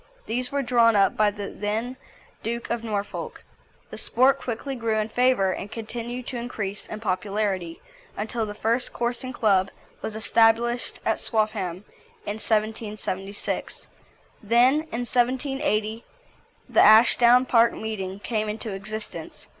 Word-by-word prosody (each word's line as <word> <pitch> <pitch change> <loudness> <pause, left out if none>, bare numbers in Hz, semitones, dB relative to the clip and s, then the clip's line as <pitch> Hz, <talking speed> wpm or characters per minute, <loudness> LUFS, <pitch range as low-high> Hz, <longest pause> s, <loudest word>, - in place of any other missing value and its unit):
These 250 +2 -2
were 280 0 0
drawn 235 -2 +4
up 195 -1 +4
by 215 -1 +4
the 205 -1 -6
then 220 +5 -3 0.5
Duke 235 +1 -4
of 235 -1 -2
Norfolk. 205 -3 -4 0.5
The - - -6
sport 265 +3 +3
quickly 260 +3 -4
grew 230 -2 -1
in 215 0 -1
favour, 245 -5 +3
and 200 - -7
continued 235 +2 -5
to 255 - -5
increase 210 -4 -5
in 215 - -6
popularity 195 -3 -2 0.4
until 220 +1 -2
the 205 - -6
first 230 +4 0
coursing 240 +2 -2
club 200 -6 +2 0.3
was 215 - -5
established 230 +2 +2
at - - +1
Swaffham 210 -4 -1 0.4
in 205 +1 -3
1776. 210 -2 -3 0.5
Then 240 +4 +4 0.2
in 245 +1 -2
1780 245 -3 0 0.6
the - - +4
Ashdown 235 +3 +7
Park 235 -2 +4
Meeting 195 -3 -5
came 215 -2 -1
into 220 +1 -4
existence. 215 +3 -7
220 Hz, 130 wpm, -25 LUFS, 210-240 Hz, 0.6 s, Ashdown